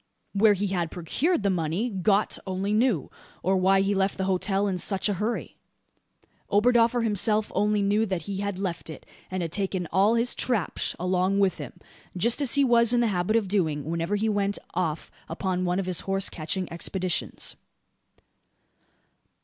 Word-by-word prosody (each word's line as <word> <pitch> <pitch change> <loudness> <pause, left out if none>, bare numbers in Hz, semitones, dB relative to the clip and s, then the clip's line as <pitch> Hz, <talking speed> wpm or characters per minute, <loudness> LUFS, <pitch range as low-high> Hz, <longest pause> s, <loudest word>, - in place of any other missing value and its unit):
Where 210 +1 +5
he 200 +1 -1
had 175 -3 -1
procured 225 - -1
the 200 - +2
money 175 +5 -1
"Gott" 200 +2 +1
only 190 +2 -1
knew, 220 - +1 0.3
or 190 +2 +2
why 190 +1 +4
he 195 +1 +1
left 195 0 0
the 190 - -1
hotel 195 +2 +1
in 185 -2 -1
such 195 +3 0
a 205 - +1
hurry. 210 +5 -3 0.9
Oberdoffer 235 +2 +3
himself 215 0 +1
only 210 0 +1
knew 210 +3 +2
that 185 -3 -2
he 200 -1 -4
had 200 -1 -3
left 185 -4 -4
it, 160 - -9 0.2
and 185 -2 -2
taken 190 -1 -2
all 205 +4 +4
his 235 +1 +1
`trapsh' 225 -9 -1
along 185 +2 +1
with 195 -2 +2
him - - -7 0.4
just 235 +9 +1
as 275 -2 +2
he 280 - +4
was 235 -2 +4
in 245 - +3
the 235 - +2
habit 180 +4 0
of 225 -4 +2
doing, 160 -8 0
whenever 170 +4 -1
he 215 +2 0
went 205 -1 0 0.2
off 170 -3 -2 0.2
upon 185 +2 -2
one 180 0 0
of 195 - -2
his 180 -2 0
horse 195 0 -1
catching 170 +3 -3
expeditions. 185 +1 -2
195 Hz, 175 wpm, -26 LUFS, 185-215 Hz, 0.9 s, Where